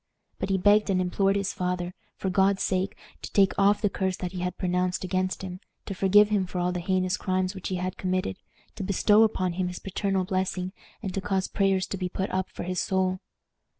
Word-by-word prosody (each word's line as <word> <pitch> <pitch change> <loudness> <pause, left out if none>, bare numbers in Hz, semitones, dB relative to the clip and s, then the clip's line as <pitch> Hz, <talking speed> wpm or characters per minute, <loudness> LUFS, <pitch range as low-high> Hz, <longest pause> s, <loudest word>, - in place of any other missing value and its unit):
But - - -2
he 195 - +2
begged 205 +3 +4
and 190 -1 +2
implored 195 +2 +1
his 200 -1 -1
father, 180 0 -2 0.2
for 190 - -2
God's 195 +1 +3
sake, 190 +1 -1 0.2
to - - -7
take 195 -2 +4
off 200 +2 +4
the 205 - +4
curse 190 -1 -1
that 180 -1 -4
he 185 - -5
had 180 0 -3
pronounced 180 0 0
against 185 0 -1
him, 180 -1 -6 0.3
to 200 - -4
forgive 205 +2 +5
him 200 -3 +1
for 180 - -6
all 180 0 +1
the 180 - -2
heinous 185 +1 0
crimes 185 0 0
which 190 -2 -6
he 185 - -2
had 185 +1 -3
committed, 185 - -1 0.4
to - - -3
bestow 205 +3 +4
upon 185 -5 +2
him 180 +1 -1
his 180 0 -5
paternal 195 0 -1
blessing, 185 -1 -2 0.3
and 190 -3 -3
to 195 - -2
cause 190 0 0
prayers 195 -2 +1
to 195 - -4
be 180 -1 -2
put 190 +2 -3
up 185 0 -1
for - - -7
his 180 0 -1
soul. 185 -1 0
185 Hz, 220 wpm, -27 LUFS, 180-195 Hz, 0.4 s, forgive